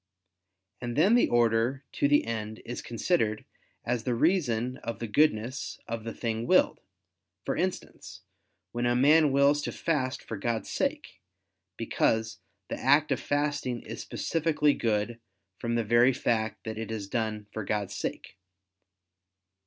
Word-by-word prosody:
And 120 Hz, -1 st, -4 dB
then 185 Hz, -, +4 dB
the 240 Hz, -, +4 dB
order 120 Hz, +3 st, +2 dB
to -, -, +1 dB
the 145 Hz, +1 st, +3 dB
end 110 Hz, -1 st, -4 dB
is 120 Hz, -, -5 dB
considered 115 Hz, -3 st, 0 dB, 0.4 s
as 120 Hz, -1 st, -1 dB
the 125 Hz, 0 st, 0 dB
reason 125 Hz, -6 st, +1 dB
of 115 Hz, -, -5 dB
the 120 Hz, -, -4 dB
goodness 115 Hz, -2 st, 0 dB
of 115 Hz, -1 st, -4 dB
the 115 Hz, -, -3 dB
thing 115 Hz, 0 st, -3 dB
willed: -, -, +3 dB, 0.6 s
for -, -, -1 dB
instance, -, -, -4 dB, 0.5 s
when 120 Hz, +1 st, -1 dB
a 120 Hz, -, +2 dB
man 150 Hz, +3 st, +5 dB
wills 140 Hz, +2 st, +4 dB
to -, -, -3 dB
fast 130 Hz, -6 st, -1 dB
for 115 Hz, -, -6 dB
God's 115 Hz, +2 st, -2 dB
sake; -, -, -2 dB, 0.6 s
because 110 Hz, 0 st, 0 dB, 0.3 s
the -, -, -5 dB
act 145 Hz, +3 st, +4 dB
of 130 Hz, -, +1 dB
fasting 145 Hz, -4 st, -1 dB
is -, -, -7 dB
specifically 155 Hz, -3 st, +1 dB
good 115 Hz, 0 st, -1 dB, 0.4 s
from 115 Hz, 0 st, -1 dB
the 115 Hz, -, +1 dB
very 120 Hz, +4 st, +4 dB
fact 110 Hz, -3 st, -1 dB
that 110 Hz, -1 st, -5 dB
it 115 Hz, -, -5 dB
is 110 Hz, -3 st, -4 dB
done 110 Hz, -1 st, -2 dB
for 110 Hz, -, -4 dB
God's 100 Hz, -1 st, -2 dB
sake. -, -, -5 dB
120 Hz, 150 wpm, -28 LUFS, 110-140 Hz, 0.6 s, man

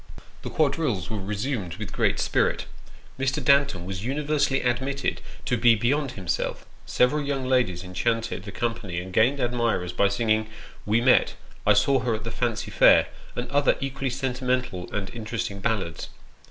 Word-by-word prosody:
The -, -, -5 dB
quadrilles 140 Hz, -, 0 dB
were 110 Hz, -, -2 dB
resumed 100 Hz, -2 st, -3 dB
with 105 Hz, -5 st, -7 dB
great -, -, +1 dB
spirit. -, -, +1 dB, 0.5 s
Mr. 135 Hz, +1 st, 0 dB
Danton 140 Hz, -11 st, +3 dB
was 95 Hz, +1 st, -5 dB
universally 140 Hz, +1 st, 0 dB
admitted 130 Hz, +3 st, -1 dB, 0.2 s
to 125 Hz, -, +1 dB
be 115 Hz, 0 st, +5 dB
beyond 130 Hz, +4 st, 0 dB
himself; 90 Hz, -7 st, -3 dB, 0.2 s
several 145 Hz, +5 st, +2 dB
young 140 Hz, -2 st, -2 dB
ladies 120 Hz, -9 st, +1 dB
enchanted 115 Hz, +4 st, -1 dB
the 100 Hz, +1 st, -8 dB
company 115 Hz, -5 st, -3 dB
and 90 Hz, +1 st, -8 dB
gained 125 Hz, +8 st, +3 dB
admirers 120 Hz, -8 st, 0 dB
by 100 Hz, +3 st, +3 dB
singing 110 Hz, +1 st, +1 dB, 0.2 s
" -, -, -21 dB
We 110 Hz, +3 st, +3 dB
met 125 Hz, +1 st, +4 dB
" -, -, -23 dB
" -, -, -25 dB
I -, -, +7 dB
saw 135 Hz, -1 st, +3 dB
her 120 Hz, -2 st, 0 dB
at 110 Hz, -, -6 dB
the 115 Hz, -, -5 dB
Fancy 115 Hz, -3 st, -2 dB
Fair -, -, +6 dB
" -, -, -21 dB
and 120 Hz, -, -3 dB
other 145 Hz, 0 st, +3 dB
equally 135 Hz, 0 st, -3 dB
sentimental 125 Hz, -6 st, -2 dB
and 95 Hz, -2 st, -3 dB
interesting 110 Hz, -3 st, -4 dB
ballads. 95 Hz, -6 st, -2 dB
120 Hz, 170 wpm, -25 LUFS, 100-135 Hz, 0.5 s, I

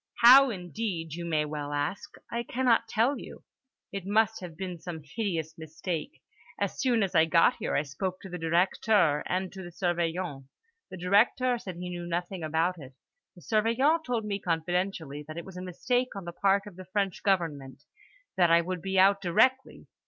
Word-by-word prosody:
"How 265 Hz, +3 st, +9 dB
indeed, 180 Hz, -4 st, -4 dB
you 170 Hz, +1 st, -5 dB
may 155 Hz, -2 st, 0 dB
well 145 Hz, -1 st, -5 dB
ask! 150 Hz, +8 st, -3 dB, 0.2 s
I 235 Hz, -, -1 dB
cannot 235 Hz, -1 st, +1 dB
tell 235 Hz, +5 st, +1 dB
you. -, -, -11 dB, 0.5 s
It 195 Hz, -2 st, -5 dB
must 220 Hz, +3 st, +2 dB
have 170 Hz, -3 st, -9 dB
been 180 Hz, -2 st, -5 dB
some 160 Hz, -2 st, -7 dB
hideous 165 Hz, -2 st, -3 dB
mistake. 160 Hz, -, -5 dB, 0.4 s
As -, -, -2 dB
soon 240 Hz, -5 st, +2 dB
as 190 Hz, -, -2 dB
I 160 Hz, -, +5 dB
got 165 Hz, +1 st, +4 dB
here -, -, -2 dB
I 145 Hz, -, +2 dB
spoke 180 Hz, +7 st, -4 dB
to -, -, -9 dB
the 180 Hz, 0 st, -6 dB
Directeur 170 Hz, -1 st, +2 dB
and 185 Hz, +1 st, -2 dB
to 190 Hz, -, -8 dB
the 175 Hz, -, -8 dB
Surveillant. 170 Hz, -4 st, -2 dB, 0.4 s
The 185 Hz, -, -8 dB
Directeur 230 Hz, +7 st, +2 dB
said 195 Hz, -7 st, -7 dB
he 180 Hz, +1 st, -6 dB
knew 175 Hz, -1 st, -5 dB
nothing 175 Hz, +2 st, -3 dB
about 165 Hz, +3 st, 0 dB
it; 130 Hz, -2 st, -12 dB, 0.4 s
the 175 Hz, -, -15 dB
Surveillant 235 Hz, -, +2 dB
told 240 Hz, -6 st, -2 dB
me 200 Hz, -1 st, -2 dB
confidentially 165 Hz, -3 st, -2 dB
that 155 Hz, +1 st, -8 dB
it 170 Hz, -, -6 dB
was 190 Hz, -, -11 dB
a 180 Hz, -, -6 dB
mistake 245 Hz, +7 st, -1 dB
on 195 Hz, -3 st, -6 dB
the 170 Hz, -, -6 dB
part 195 Hz, +2 st, +2 dB
of 200 Hz, -4 st, -11 dB
the 185 Hz, -, -9 dB
French 195 Hz, 0 st, -2 dB
government; 160 Hz, -9 st, -1 dB, 0.5 s
that 175 Hz, -2 st, +4 dB
I 170 Hz, 0 st, +6 dB
would 180 Hz, 0 st, -4 dB
be 190 Hz, +1 st, -2 dB
out 195 Hz, +1 st, +5 dB
directly. 260 Hz, +9 st, +1 dB
180 Hz, 190 wpm, -28 LUFS, 165-205 Hz, 0.5 s, How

